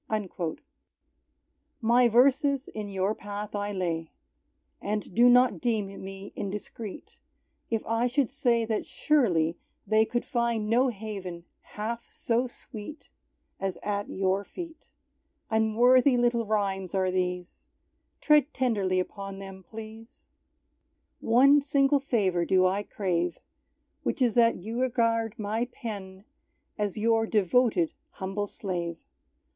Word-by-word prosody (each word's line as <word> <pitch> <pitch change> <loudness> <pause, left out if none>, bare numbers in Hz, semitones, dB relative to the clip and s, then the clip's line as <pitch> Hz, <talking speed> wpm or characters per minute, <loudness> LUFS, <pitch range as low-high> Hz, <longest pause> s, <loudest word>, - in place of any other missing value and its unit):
_" 185 -6 -3 1.2
My 240 +1 +4
verses 270 +3 +3
in 210 -1 -6
Your 195 +1 0
path 205 0 -6
I 205 0 -2
lay, 170 -4 -2 0.7
And 210 -2 -3
do 240 +4 +6
not 250 +1 +4
deem 210 -6 -2
me 195 +1 -8
indiscreet, 205 +1 -6 0.5
If 225 -2 -1
I 230 +2 +1
should 260 0 +1
say 240 -4 +2
that 220 -1 -1
surely 175 - +2 0.3
they 220 0 +4
Could 240 +1 -2
find 235 -4 0
no 245 +4 +3
haven 195 -6 -6 0.2
half 230 +3 -5
so 240 +2 0
sweet 245 +4 -10 0.5
As 195 -1 -2
at 205 0 -2
Your 190 +1 0
feet. 330 - -9 0.6
Unworthy 245 +4 +4
little 240 -2 +1
rhymes 195 -3 -1
are 185 -1 +1
these, 180 -1 -3 0.5
Tread 300 -1 +4
tenderly 200 -8 +1
upon 195 +1 -5
them, 195 -1 -9
please! 220 +3 -11 0.9
One 275 +5 +5
single 275 0 +3
favour 200 -10 +1
do 185 +1 +3
I 190 +2 +1
crave, 180 -4 -1 0.6
Which - - -2
is 245 -4 +3
that 230 -6 +3
You 230 +4 -3
regard 230 -3 +1
my 220 +2 -1
pen 200 -5 -8 0.5
As 205 -2 -2
Your 225 +1 +2
devoted 210 -4 +2 0.2
humble 195 +2 -3
slave. 175 -5 -4
215 Hz, 120 wpm, -28 LUFS, 195-240 Hz, 1.2 s, do